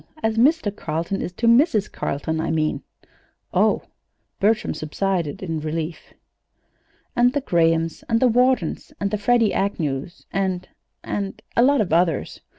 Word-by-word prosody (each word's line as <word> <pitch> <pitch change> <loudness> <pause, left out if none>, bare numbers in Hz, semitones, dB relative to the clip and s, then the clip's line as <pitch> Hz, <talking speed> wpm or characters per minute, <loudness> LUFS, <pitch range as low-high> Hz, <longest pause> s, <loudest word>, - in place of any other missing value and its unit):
As 220 0 +1
Mr. 240 -3 +3
Carleton 165 +3 -3
is - - -3
to 230 - -3
Mrs. 230 - +4
Carleton, 160 +3 -2
I - - -2
mean." 155 -1 0 0.7
"Oh!" - - +3 0.6
Bertram 215 +2 +2
subsided 165 +1 -2
in 165 -3 -2
relief. 155 +1 -5 1.0
"And 245 +1 +4
the 285 - 0
Grahams 165 - +1
and 230 -1 +3
Whartons, 250 -6 +2
and 200 0 -1
the 210 - -1
Freddie 230 0 +3
Agnews, 165 -5 -2
and 185 -2 -1 0.4
and 200 -1 -4 0.2
a - - +4
lot 275 +1 +4
of 175 -6 -1
others. 170 -3 +1
195 Hz, 140 wpm, -22 LUFS, 165-230 Hz, 1.0 s, Mrs